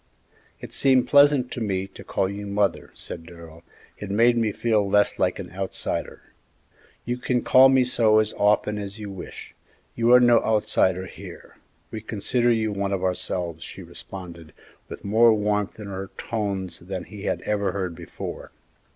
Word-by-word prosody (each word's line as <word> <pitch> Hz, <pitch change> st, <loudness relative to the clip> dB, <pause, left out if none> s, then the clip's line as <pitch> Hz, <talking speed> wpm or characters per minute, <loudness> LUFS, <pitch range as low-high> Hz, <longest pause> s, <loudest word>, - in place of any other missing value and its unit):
"It -, -, -10 dB
seemed 130 Hz, -3 st, +3 dB
pleasant 140 Hz, -3 st, +5 dB
to 120 Hz, -, -5 dB
me 95 Hz, -3 st, -1 dB
to -, -, -12 dB
call 95 Hz, -, -1 dB
you 100 Hz, +1 st, -6 dB
'mother,'" 100 Hz, 0 st, 0 dB
said 85 Hz, -, -8 dB
Darrell; 85 Hz, -1 st, -13 dB, 0.4 s
"it 105 Hz, -, -6 dB
made 115 Hz, +4 st, +4 dB
me 115 Hz, -2 st, +1 dB
feel 105 Hz, -2 st, 0 dB
less 105 Hz, +1 st, +2 dB
like 90 Hz, -, +1 dB
an 90 Hz, -3 st, -8 dB
outsider." 95 Hz, +1 st, -4 dB, 0.7 s
"You 120 Hz, +1 st, -2 dB
can 125 Hz, -1 st, 0 dB
call 130 Hz, +1 st, +7 dB
me 130 Hz, -1 st, +4 dB
so 115 Hz, -3 st, +3 dB
as 110 Hz, 0 st, +2 dB
often 105 Hz, 0 st, +1 dB
as 100 Hz, 0 st, -6 dB
you 105 Hz, -2 st, -7 dB
wish; 95 Hz, -, -9 dB, 0.4 s
you 115 Hz, +1 st, +2 dB
are 125 Hz, -, +9 dB
no 120 Hz, -2 st, +5 dB
outsider 95 Hz, -4 st, +1 dB
here; -, -, -12 dB, 0.3 s
we 110 Hz, -, -6 dB
consider 120 Hz, +3 st, 0 dB
you 110 Hz, -2 st, +1 dB
one 100 Hz, -1 st, -2 dB
of 95 Hz, -1 st, -2 dB
ourselves," 90 Hz, -3 st, -2 dB
she 95 Hz, -, -9 dB
responded, 85 Hz, -1 st, -10 dB, 0.4 s
with -, -, -9 dB
more 110 Hz, +2 st, +5 dB
warmth 105 Hz, 0 st, -1 dB
in 105 Hz, -, -7 dB
her 95 Hz, -1 st, -6 dB
tones 100 Hz, -6 st, -3 dB
than 90 Hz, 0 st, -6 dB
he 105 Hz, +1 st, -10 dB
had -, -, -1 dB
ever 105 Hz, -1 st, -1 dB
heard 95 Hz, -3 st, -3 dB
before. 85 Hz, 0 st, -8 dB
105 Hz, 170 wpm, -24 LUFS, 95-115 Hz, 0.7 s, are